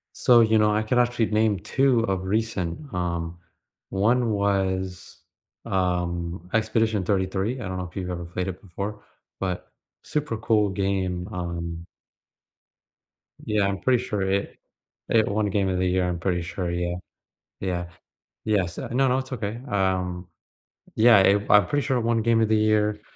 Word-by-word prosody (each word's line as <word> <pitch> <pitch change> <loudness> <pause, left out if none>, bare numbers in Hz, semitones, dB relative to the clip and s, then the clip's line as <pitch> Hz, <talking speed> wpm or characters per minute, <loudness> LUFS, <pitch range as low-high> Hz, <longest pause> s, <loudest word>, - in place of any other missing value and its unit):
So, 120 -2 +5
you 110 -1 +4
know, 105 0 +3
I 110 - +1
can 120 +3 0
actually 120 -2 +2
name 110 -2 +2
2 135 +2 +2
of 95 -4 -1
recent. 95 -4 -1
Um, 85 -1 -3 0.5
one 115 +5 +2
was, 95 -3 -1 0.5
um, 90 -2 -2
Expedition 110 -2 +1
33, 95 +5 -1
I 90 - -4
don't 95 - -4
know 90 - -3
if - - -20
you've 90 -2 -3
ever 85 -1 -4
played 90 +2 -4
it 95 0 -6
before, 100 +2 -6 0.4
but 90 -2 -3 0.3
super 150 -6 -2
cool 110 -2 +2
game, 95 -2 -1
um 85 -2 -5 1.6
Yeah, 105 -2 +1
I'm 100 0 -1
pretty 125 +1 +2
sure 105 -6 -2
it 95 +1 -1 0.5
It 110 -2 +4
won 105 +1 0
Game 100 -1 +1
of 95 - 0
the 90 - +1
Year, 90 0 +1
I'm 85 -1 -2
pretty 90 -1 0
sure, 85 +1 -4
yeah. 85 0 -2 0.6
Yeah. 90 -2 -2 0.6
Yes 95 -6 0
uh, - - -4
no, 135 +2 +3
no, 125 +1 +2
it's 130 0 -6
okay. 110 -1 -4
Um, 90 -2 0 0.7
yeah 110 -1 +7
if 100 +2 +3
I'm 105 -3 +6
pretty 145 +8 -1
sure 130 -3 +1
won 115 -1 +1
Game 115 0 +3
of 110 - +2
the 110 - +3
Year, 105 -1 +2
100 Hz, 165 wpm, -25 LUFS, 90-110 Hz, 1.6 s, yeah